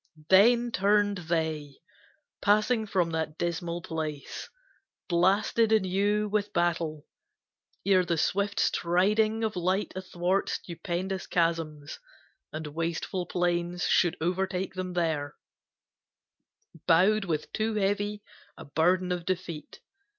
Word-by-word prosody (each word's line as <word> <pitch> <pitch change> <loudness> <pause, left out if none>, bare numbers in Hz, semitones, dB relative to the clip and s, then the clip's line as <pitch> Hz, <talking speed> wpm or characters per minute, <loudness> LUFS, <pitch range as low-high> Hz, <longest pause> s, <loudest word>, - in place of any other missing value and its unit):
Then 235 +5 +5
turned 205 -1 +2
they, 155 -4 -1 0.7
passing 215 +2 +2
from 180 -4 +1
that 160 -1 -3
dismal 170 0 -3
place 155 -3 -5 0.6
Blasted 200 +5 +2
anew 205 +1 +2
with 205 0 -1
battle, 170 -4 0 0.8
ere 190 -2 +4
the 170 -2 -1
swift 200 +5 0
Striding 210 +6 +2
of 220 -1 -1
light 185 +3 0
athwart 185 0 -1
stupendous 180 +2 -4
chasms 165 -4 -1 0.5
And 155 0 -5
wasteful 165 +4 -3
plains, 175 0 -1
should 175 -1 +3
overtake 185 +2 -1
them 185 -1 -4
there, 155 -4 -1 1.5
Bowed 195 +5 +4
with 155 -4 -3
too 220 0 -1
heavy 205 +1 -1 0.3
a - - -10
burden 180 +5 +1
of 175 -1 -2
defeat. 170 -4 -5
180 Hz, 105 wpm, -28 LUFS, 165-205 Hz, 1.5 s, Then